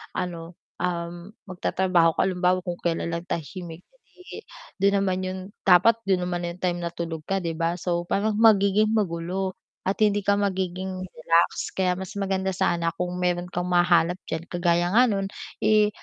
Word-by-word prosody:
ano, 170 -1 -4 0.2
um, 175 +2 -4
magtatrabaho 180 -3 +1
ka - - +2
halimbawa 180 -1 +1
kung 175 -1 -4
kailan 170 0 -1
lang 170 +1 -4
tahimik, 170 0 -6
eh - - -22
di, - - -9 0.4
dun 200 0 +3
naman 185 -1 0
yun 185 0 -3 0.3
dapat 195 +5 +6
dun 185 -2 +2
naman 175 -1 -2
yung 170 +1 -7
time 175 -1 0
natulog 170 -2 -4
ka 195 -1 -1
'di 165 -1 -2
ba. 165 +1 +1
So 175 -1 -2
parang 210 +1 0
magiging 215 0 +4
magulo 185 -1 -1 0.3
at 195 - -1
hindi 205 -1 +3
ka 200 0 +2
magiging 190 -1 -2
relax 165 +1 +1
kaya 180 -1 +1
mas 190 +2 -7
maganda 190 -1 -1
sana 170 -1 0
kung 180 +1 -3
meron 180 0 -1
kang 175 0 -2
mahanap 175 -1 +3 0.2
diyan 160 +1 -3
kagaya 175 +1 +1 0.2
nun 195 -1 0 0.3
eh, 215 -1 +4
180 Hz, 165 wpm, -25 LUFS, 175-195 Hz, 0.4 s, dapat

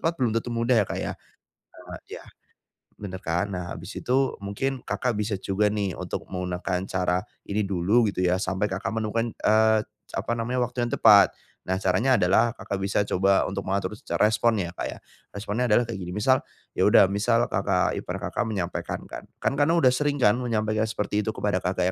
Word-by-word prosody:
tepat 165 +1 0
belum 125 -6 +1
tentu 115 +2 -1
mudah 115 0 +2
ya 100 - 0
Kak - - -3
ya. - - -3 0.6
Heeh - - -11 0.2
ya. - - -15 0.7
Benar 95 -2 -7
kan? 90 +5 -1
Nah 90 -1 -5
habis 90 +5 -9
itu 135 +2 +1
mungkin 125 +7 -3
Kakak 125 0 -2
bisa 105 -1 -1
juga 100 +2 0
nih 100 -2 -1
untuk - - -4
menggunakan 90 0 -2
cara 90 -1 0 0.2
ini 105 +1 -2
dulu 100 +4 +2
gitu 90 -2 -1
ya 90 +1 +2
sampai 95 +1 -1
Kakak 95 +1 -3
menemukan, 110 +1 -2
eee, 110 0 +3 0.3
apa - - -2
namanya 125 +2 -1
waktu 120 0 -2
yang - - -6
tepat. 100 -4 +7 0.4
Nah 95 - +1
caranya 100 +7 +2
adalah 110 +5 +3
Kakak 100 - -4
bisa 100 +1 +1
coba 95 0 +2
untuk - - -4
mengatur 95 0 -1
secara - - 0
respon 115 +1 +2
ya 85 - -6
Kak - - -5
ya. - - -8 0.3
Responnya 105 +4 -2
adalah 120 +2 +4
kayak 115 -4 -6
gini, 90 - -6
misal 130 +5 +3 0.4
ya - - +4
udah - - +7
misal 115 +4 +2
kakak 95 -3 +1
ipar - - -5
Kakak - - -1
menyampaikan 90 -5 -3
kan. - - -10
Kan - - +2
karena 165 +4 +4
udah 130 -7 +5
sering 145 +3 0
kan 115 -7 +4
menyampaikan 110 -2 0
seperti 105 -1 -1
itu 110 +1 -3
kepada 100 -3 0
Kakak 90 0 -1
105 Hz, 195 wpm, -25 LUFS, 95-115 Hz, 0.7 s, tepat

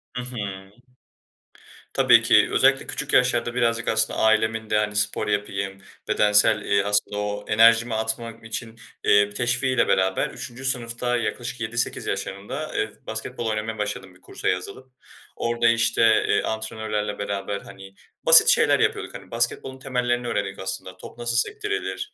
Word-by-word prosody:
Hı 125 - -2
hı. 100 -5 -7 1.2
Tabii - - +6
ki - - +4
özellikle - - +3
küçük - - -4
yaşlarda 120 -1 +2
birazcık 115 -1 0
aslında 110 0 0
ailemin 110 0 +2
de, 105 - +2
hani, 105 0 -1
spor 105 0 0
yapayım, 100 -1 -3 0.3
bedensel, 105 +1 +4
eee, 100 -1 +1
asıl 100 +1 0
o 105 0 -3
enerjimi 115 +2 +5
atmak 110 +1 -3
için, 115 0 -6 0.2
eee, 105 0 +4
teşviğiyle 125 +3 0
beraber 95 -1 +1
3'üncü 130 +2 -8
sınıfta 120 -1 -1
yaklaşık 120 +1 -4
7-8 115 +1 -2
yaşlarında, 120 +11 -4
eee, 110 - -1 0.2
basketbol 110 +2 -5
oynamaya 110 +1 -3
başladım 105 -3 -5
bir 95 - -23
kursa - - -6
yazılıp. 100 +8 -3 0.4
Orada, 120 0 0
işte, 115 0 +2 0.3
eee, 100 - +2
antrenörlerle 110 -1 -3
beraber, 100 0 -3
hani, 95 0 -13 0.3
basit - - +8
şeyler - - +4
yapıyorduk, - - -1
hani, - - -11
basketbolun 120 +3 -2
temellerini 125 -2 -1
öğrendik 100 -4 -3
aslında. 95 -1 -6
Top - - -12
nasıl 120 0 -2
sektirilir, 420 - -2
110 Hz, 145 wpm, -24 LUFS, 105-120 Hz, 1.2 s, basit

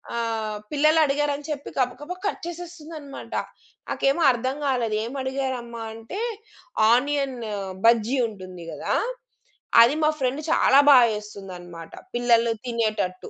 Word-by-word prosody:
ఆహ్, 225 -2 -2
పిల్లలడిగారని 295 -1 +2
చెప్పి 285 -1 -5
గబగబా 295 +8 -2
కట్ 410 - -2
చేసేస్తుందన్నమాట. 330 -4 -9 0.6
నాకేమో 275 +5 +1
అర్థం 255 +2 -2
కాలేదు. 240 -5 0
ఏం 230 - -5
అడిగారమ్మ? 260 -3 -3 0.2
అంటే 225 - -7 0.7
ఆనియన్ 275 +1 +1 0.5
బజ్జీ 230 +3 +4
ఉంటుంది 185 -5 -10
గదా! - - -2 0.9
అది 245 +5 +3
మా 305 - +5
ఫ్రెండ్ 260 +3 0
చాలా 275 - +5
బా 275 - +9 0.2
చేస్తుందనమాట 185 -5 -9 0.2
పిల్లలు 235 -1 +3
తినేటట్టు. 215 -6 -2
250 Hz, 110 wpm, -24 LUFS, 225-285 Hz, 0.9 s, బా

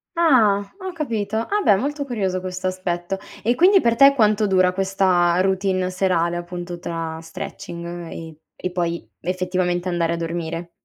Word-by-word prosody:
Ah! 240 -12 +4 0.2
Ho 375 -1 -5
capito. 220 -10 -3
Ah, 410 - 0
beh! 205 - +5
Molto 285 +7 -2
curioso 195 -7 -1
questo 185 0 -4
aspetto. 185 0 -3 0.2
E 240 +3 +2
quindi 375 +4 +6
per 235 -1 +2
te 275 +3 +7
quanto 215 -2 +3
dura 185 -1 +3
questa 185 -2 +2
routine 190 -1 0
serale, 175 -2 +1
appunto, 175 0 -6
tra 165 -2 -4
stretching 170 +1 -7 0.3
e 160 -2 -8 0.2
e 180 - -3
poi 170 -1 -2
effettivamente 180 0 -1
andare 170 -1 0
a - - -1
dormire? 170 0 -4
185 Hz, 155 wpm, -22 LUFS, 175-210 Hz, 0.3 s, te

